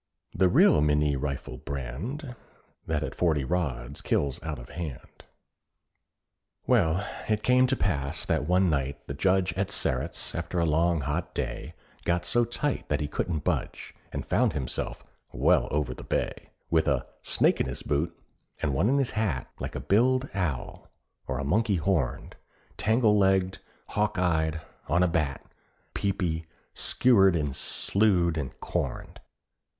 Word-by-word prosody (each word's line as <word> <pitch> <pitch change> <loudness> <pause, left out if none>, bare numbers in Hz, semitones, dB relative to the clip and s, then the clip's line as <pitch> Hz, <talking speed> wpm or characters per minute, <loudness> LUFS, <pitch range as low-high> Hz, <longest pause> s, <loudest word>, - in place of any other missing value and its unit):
The 95 - +3
real 75 - +6
Minié 75 -1 +3
rifle 70 -2 -4
brand, 85 - -5 0.5
That 75 -2 0
at - - -4
forty 80 -5 +1
rods 70 -5 -2
kills 70 -3 0
out 80 -2 -4
of - - -11
hand. 80 -7 -8 1.4
Well, 85 +5 +2 0.2
it 105 -1 +1
came 125 +1 +5
to 135 - +2
pass 70 - -1
that 70 - 0
one 90 +1 +4
night 70 -3 -1
the - - -5
Judge 95 +3 +2
At 95 +2 -1
Sterret's, 65 +6 -2
after 85 +2 -3
a 85 - +3
long, 80 +1 +2
hot 75 +5 -3
day, 60 +6 -4 0.3
Got 85 0 0
so 120 +6 +3
tight 135 +4 -2
that 75 - +1
he 75 - -1
couldn't 80 +1 -2
budge, - - -2 0.2
And - - -4
found - - +2
himself 70 -4 -3 0.3
"well - - +3
over 75 -4 -1
the - - -10
bay," - - -2 0.2
With 80 -1 +3
a 70 -4 +1 0.2
"snake - - +2
in - - 0
his 65 - -5
boot" 75 +4 -1 0.4
and 70 - 0
one 95 - +2
in 140 - +3
his 135 -3 +1
hat, 100 - -1
Like - - -5
a - - -2
biled 130 +6 +2
owl, 85 -10 -3 0.4
or 65 - -2
a 70 - -2
monkey 100 +8 +2
horned, 80 -6 -1 0.4
Tangle 110 -1 +3
legged, 95 -1 +2 0.3
hawk 105 -1 0
eyed, 80 -3 +1 0.3
on 90 +5 +3
a - - +4
bat, 75 -5 -1 0.5
Peepy, 90 -5 -1 0.3
skewered, 95 -8 +4
and 75 -4 -1
slewed, 95 -5 +1
and 75 -5 -4
corned. - - -3
85 Hz, 155 wpm, -28 LUFS, 70-95 Hz, 1.4 s, real